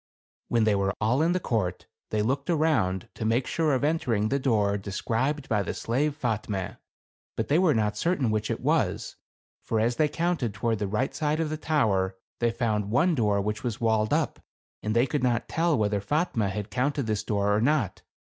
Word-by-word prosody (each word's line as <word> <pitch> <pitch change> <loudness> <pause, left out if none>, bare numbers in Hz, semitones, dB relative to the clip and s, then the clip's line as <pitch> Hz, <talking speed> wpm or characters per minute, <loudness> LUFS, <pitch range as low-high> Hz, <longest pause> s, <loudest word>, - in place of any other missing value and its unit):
When 115 -2 +2
they 110 -1 +3
were 100 0 0
all 115 +7 +2
in 170 +2 +3
the 185 - +1
court, 105 - -2 0.2
they 105 -1 0
looked 135 +7 -1
around 130 - +1
to - - -6
make 115 +3 +1
sure 155 -4 +1
of 130 - -1
entering 120 -9 +1
the 140 - +1
door 105 -6 +2
de 100 0 -5
scribed 130 +8 -1
by 105 -2 +1
the 95 - -4
slave 140 +5 -1
Fatme. 105 -5 -2 0.6
But - - -2
they 150 +4 +4
were 180 -6 +4
not 105 -1 0
certain 150 -6 +1
which 110 -1 -1
it - - -2
was; - - 0 0.5
for 110 - -1
as 120 +2 +1
they 155 - +4
counted 155 - -1
toward 110 +1 0
the 105 - -1
right 110 +7 -1
side 155 0 0
of 160 -2 -1
the - - -1
tower, 105 -12 +1 0.2
they 120 - +2
found 110 -4 -1
one 140 - +3
door 105 -7 +2
which 105 +2 -3
was 115 -3 -3
walled 110 -2 +1
up, - - 0 0.4
and 110 +1 -2
they 120 +2 +4
could 145 0 -1
not 120 -2 +1
tell 165 -2 +1
whether 105 -2 +1
Fatme 120 - 0
had 105 +1 -5
counted 135 +4 0
this 110 -2 -1
door 105 -1 +1
or 105 - +1
not. 130 - +1
115 Hz, 205 wpm, -27 LUFS, 105-145 Hz, 0.6 s, they